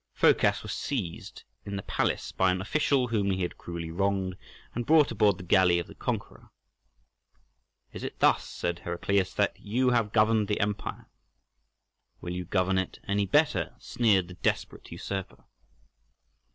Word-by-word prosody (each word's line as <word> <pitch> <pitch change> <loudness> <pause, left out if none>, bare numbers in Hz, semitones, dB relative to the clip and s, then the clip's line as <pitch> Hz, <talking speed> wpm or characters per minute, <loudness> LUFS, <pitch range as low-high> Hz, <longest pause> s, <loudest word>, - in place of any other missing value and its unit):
Phocas - - +3
was - - -4
seized 105 -13 -4 0.2
in 100 - -5
the 95 - -4
palace - - -1
by 95 - +2
an 90 0 +1
official 130 +4 +1
whom 105 -4 +1
he 95 -1 0
had 90 - -4
cruelly 85 -1 -6
wronged, 95 +1 0 0.4
and 120 0 -4
brought 155 -3 +5
aboard 105 -4 +3
the - - -9
galley 90 -1 +4
of 85 - -2
the - - -13
conqueror. - - -5 1.4
"Is - - -7
it - - -5
thus," - - +3
said 85 0 -3
Heraclius, 95 +2 0
"that 105 - +1
you 125 +5 +1
have 115 -4 +1
governed 110 -1 +3
the 105 - -1
empire?" 105 0 -3 1.1
"Will 85 - -5
you 90 0 -4
govern 95 +1 +1
it 95 - -4
any 100 0 +1
better?" 150 +1 +2
sneered 105 -8 +2
the 90 - -10
desperate - - -2
usurper. 95 -2 -5
100 Hz, 155 wpm, -28 LUFS, 90-110 Hz, 1.4 s, brought